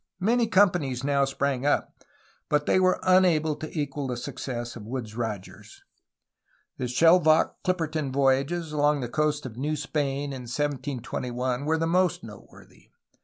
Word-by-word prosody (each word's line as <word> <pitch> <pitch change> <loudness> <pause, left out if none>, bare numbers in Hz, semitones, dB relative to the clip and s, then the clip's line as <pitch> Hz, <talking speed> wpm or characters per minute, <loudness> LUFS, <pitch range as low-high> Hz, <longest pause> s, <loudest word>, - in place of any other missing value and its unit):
Many 230 +4 +2
companies 180 - +2
now 140 0 +2
sprang 135 -1 -1
up, 145 - -1 0.5
but 150 0 +1
they - - +3
were 185 0 +3
unable 175 -5 +3
to 155 - -6
equal 145 -1 -3
the 125 -1 -3
success 120 -1 -5
of 105 -3 -9
Woodes 115 -3 -5
Rogers. 110 -5 -6 0.9
The 125 - -2
Shel 165 +8 +5
vocke 155 0 +3
Clipperton 160 -6 -1
voyages 140 +5 +1
along 145 -1 +2
the 120 - -3
coast 150 +3 -1
of 120 -3 -8
New 150 +4 -1
Spain 145 -1 -2
in 125 -3 -8
1721 130 -2 -3
were 160 +1 +1
the 165 - 0
most 180 +1 +1
noteworthy. 105 -2 -14
145 Hz, 150 wpm, -26 LUFS, 130-160 Hz, 0.9 s, Shel